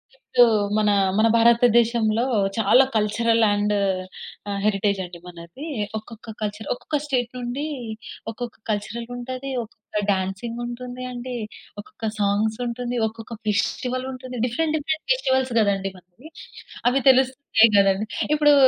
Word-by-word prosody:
ఇప్పుడు 250 -2 +3 0.3
మన 210 -1 +3 0.3
మన 220 +1 +5
భారతదేశంలో 235 -1 +4 0.3
చాలా 225 +4 +6
కల్చరల్ 225 +2 +2
అండ్ 205 0 +1 0.8
ఆహ్, 200 0 -2
హెరిటేజ్ 200 -1 +1
అండి 175 -1 -11
మనది. 175 - -10 0.3
ఒక్కొక్క 225 +1 -11
కల్చర్ 210 0 -4
ఒక్కొక్క 295 +4 -3
స్టేట్ 250 -5 0
నుండి 250 +4 -3 0.7
ఒక్కొక్క 240 0 -6
కల్చరల్ 220 +3 -3
ఉంటది. 255 +2 -5
ఒక్కొక్క 215 -1 -6
డాన్సింగ్ 195 +5 -2
ఉంటుంది 250 +1 -6
అండి. 250 0 -6 0.5
ఒక్కొక్క 220 +1 -5
సాంగ్స్ 205 +2 +1
ఉంటుంది. 245 +1 -3
ఒక్కొక్క 225 +1 -8
ఫెస్టివల్ 250 +5 -1
ఉంటుంది. 255 -1 -8
డిఫరెంట్ 310 +6 0
డిఫరెంట్ 310 +1 -3
ఫెస్టివల్స్ 260 - 0
కదండీ 195 -2 +1
మనకి. 185 - -16 0.6
అవి 270 +2 +1
తెలుస్తుంటాయి 260 -3 +4
కదండీ! 195 +1 +3 0.3
ఇప్పుడు 295 -1 +5
230 Hz, 120 wpm, -23 LUFS, 210-255 Hz, 0.8 s, చాలా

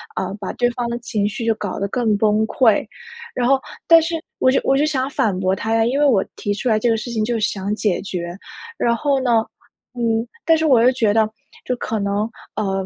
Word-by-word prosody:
呃， 190 0 -2
把 195 - -5
对 245 0 +1
方 240 0 -3
的 235 - -2
情 210 -3 -1
绪 225 +3 -4
就 225 - +3
搞 205 -3 -5
得 200 - -1
更 225 -3 +1
崩 215 +1 +2
溃。” 225 -4 +3 0.5
然 245 -1 +1
后 270 0 +4 0.3
但 330 -1 +8
是 330 +1 -2 0.2
我 260 - +4
就 - - +2
我 270 - +2
就 295 - +3
想 270 -3 -1
反 205 -8 0
驳 190 0 +1
他 220 +3 -2
呀， 225 - +3
因 265 +4 0
为 295 - +4
我 225 -9 +4
提 205 - -2
出 245 +5 -2
来 220 - +3
这 240 - 0
个 225 - +3
事 235 +2 -6
情， 220 -2 -1
就 240 +1 -1
是 - - -5
想 200 +1 -3
解 210 -4 0
决。 175 -2 -5 0.4
然 235 0 +2
后 280 +2 +1
呢， 235 -3 +3 0.5
嗯， 230 -1 0 0.2
但 325 - +5
是 320 - 0
我 250 -5 +5
又 255 - +6
觉 225 -5 +2
得 220 -1 +3 0.4
就 250 - -1
可 220 - -3
能， 200 +2 -1 0.3
呃， 195 -2 -1
225 Hz, 255 characters per minute, -20 LUFS, 205-250 Hz, 0.5 s, 但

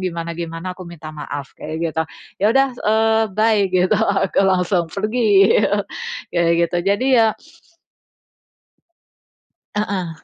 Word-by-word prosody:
gimana-gimana 170 0 -4
aku 185 - -9
minta 160 -2 -9
maaf." 145 -2 -7
Kayak 155 +1 -6 0.2
gitu. 160 - 0 0.4
"Ya - - +5
sudah," 270 0 +4
eee, 220 0 +2
"bye!" 215 -1 +3
gitu, 185 +3 +2
aku 200 -3 +1
langsung 180 -2 +1
pergi, 210 0 +3 0.7
kayak 170 -1 +2 0.2
gitu. 175 - -2
Jadi 205 +6 +1
ya 225 - +5 2.5
Heeh. 185 -6 -3
185 Hz, 110 wpm, -19 LUFS, 170-215 Hz, 2.5 s, Ya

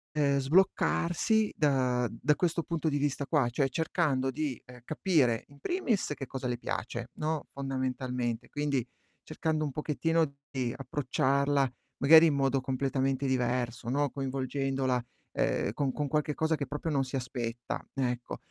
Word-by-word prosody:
uhm, 140 -2 +3
sbloccarsi 185 - +2
da 130 -5 +2
da 150 +6 +1
questo 170 0 +1
punto 165 -1 -1
di 145 - 0
vista 145 0 -1
qua, 145 -4 +2
cioè 135 +3 +1
cercando 145 -4 0
di, 145 -2 -3
ehm, 125 -1 -13
capire 145 - +2
in 140 0 -18
primis 255 - 0
che 135 - -6
cosa 130 -1 -4
le 120 -1 -1
piace, - - -4
no, 155 -1 -1
fondamentalmente. 130 -3 -2
Quindi, 145 -4 -1 0.4
cercando 155 0 -1
un 145 - -3
pochettino 160 +3 +1 0.2
di 125 -3 -2
approcciarla 135 +1 +1 0.3
magari 160 +3 +8
in 155 - +2
modo 135 -1 +2
completamente 135 +1 0
diverso, 125 -2 -1
no, 145 +2 +1
coinvolgendola, 135 -1 -1 0.3
uhm, - - +1
con 140 -2 0
con 145 +2 -2
qualche 150 +1 0
cosa 160 +2 +1
che 140 -2 -4
proprio 150 +3 -3
non 140 -2 +2
si 130 +1 -5
aspetta, 120 -2 -4
ecco. 125 -2 -2
135 Hz, 150 wpm, -30 LUFS, 130-150 Hz, 0.4 s, magari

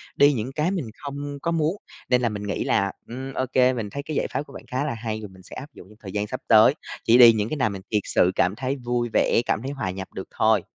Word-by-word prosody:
đi 145 +1 +5
những 120 +1 -3
cái 155 +4 +1
mình 180 -9 -2 0.2
không 145 0 -5
có 170 - -1
muốn, 165 +1 +1 0.3
nên 125 -1 +3
là 120 - +2
mình 105 -1 -5
nghĩ 100 - -2
là, 100 0 +1 0.2
ừm, 130 +3 -6
ô 130 - -1
kê 130 0 +4
mình 115 -4 -4
thấy 140 +6 -5
cái 155 - -5
giải - - 0
pháp 130 - 0
của - - -16
bạn - - -9
khá 130 +3 -1
là 145 - -2
hay 110 -1 -4
rồi 105 - -8
mình 95 0 -16
sẽ - - -12
áp 140 - -8
dụng 90 - -13
trong 105 - -17
thời 95 -3 -8
gian 105 0 -2
sắp 130 +4 -5
tới, 110 +4 +7 0.3
chỉ 115 - +5
đi 120 -2 +9
những 110 0 -1
cái 155 - -3
nào 115 -6 +2
mình 100 -2 -6
thiệt 105 -2 +2
sự 90 - +3
cảm 90 +3 +2
thấy 130 +3 -2
vui 120 -2 -2
vẻ, - - +3
cảm 110 - 0
thấy 135 - -4
hòa 120 -10 -3
nhập 95 +1 -6
được 95 - -6
thôi. 110 -3 +4
120 Hz, 295 wpm, -24 LUFS, 105-140 Hz, 0.3 s, đi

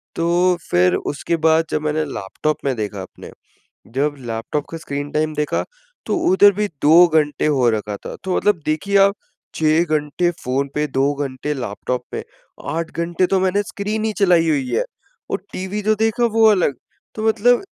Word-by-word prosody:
तो 175 +2 +2
फिर 90 +1 +3
उसके 145 +4 -2
बाद 160 0 +4
जब 150 - -1
मैंने 155 +1 0
लैपटॉप 140 +4 -3
में 135 - +1
देखा 105 -3 -4
अपने 95 - -11 0.6
जब 145 +2 +1
लैपटॉप 120 +4 -4
का 165 - -5
स्क्रीन 145 -2 -5
टाइम 155 0 0
देखा 150 0 -1 0.4
तो - - 0
उधर 205 - +6
भी 210 +2 -1 0.2
2 165 +4 +7
घंटे 155 -2 +1
हो 130 -5 +3
रखा 105 -2 -3
था - - -8
तो 185 - 0
मतलब 205 -5 +2
देखिए, 195 +6 0
आप 200 0 +5 0.4
6 155 +1 +3
घंटे 155 +2 0
फ़ोन 140 -5 -2
पे, 150 0 0
2 135 +1 +1
घंटे 140 +1 -3
लैपटॉप 125 0 -3
पे, - - -3 0.5
8 165 +1 -3
घंटे 170 +2 0
तो 190 +1 +1
मैंने 190 +2 +1
स्क्रीन 215 +2 -3
ही 220 - 0
चलाई 175 -4 +4
हुई 140 -5 0
है - - +1 0.5
और - - 0
टीवी 190 +3 -4
जो 215 +1 +2
देखा 225 +2 +1
वो 225 - +4
अलग। 180 -9 +2 0.4
तो 220 0 -3
मतलब 240 - +3
155 Hz, 180 wpm, -20 LUFS, 140-190 Hz, 0.6 s, 2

